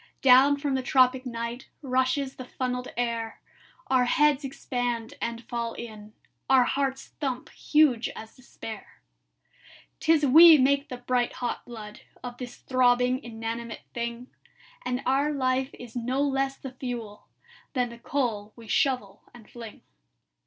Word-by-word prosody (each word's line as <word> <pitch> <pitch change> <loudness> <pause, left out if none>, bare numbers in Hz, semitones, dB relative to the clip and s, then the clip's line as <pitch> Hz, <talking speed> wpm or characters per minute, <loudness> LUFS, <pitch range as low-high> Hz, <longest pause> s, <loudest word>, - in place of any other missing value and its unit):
"Down 270 +2 +7
from 285 -1 -2
the 265 - 0
tropic 255 0 +3
night 235 +1 -5
Rushes 260 +1 0
the 255 - -7
funnelled 250 0 -3
air; 230 -2 -2 0.5
Our 255 -1 +3
heads 295 +2 +3
expand 245 -4 -3
and 235 0 -3
fall 235 -1 -3
in; 215 -2 -9 0.4
Our 265 -1 +6
hearts 270 +1 -1
thump 265 -4 -3
huge 290 -7 +2
as 220 0 -10
despair. 235 -3 -10 1.0
"'Tis 320 -2 +3
we 320 +4 +9
make 280 +2 +2
the 250 - -5
bright 245 0 0
hot 245 - -3
blood 215 -3 -9 0.2
Of 245 -1 -7
this 245 -1 -7
throbbing 250 0 +2
inanimate 230 0 -6
thing; 235 +1 -5 0.5
And 250 +2 -2
our 275 +3 +2
life 260 -1 0
is 245 -1 -11
no 250 +3 -1
less 270 -1 0
the 265 - -8
fuel 240 -5 -6 0.5
Than 250 -3 0
the 235 0 -11
coal 230 -6 -2
we 230 -2 -13
shovel 205 -1 0
and 230 -3 -15
fling. 230 -3 -11
250 Hz, 140 wpm, -27 LUFS, 235-265 Hz, 1.0 s, we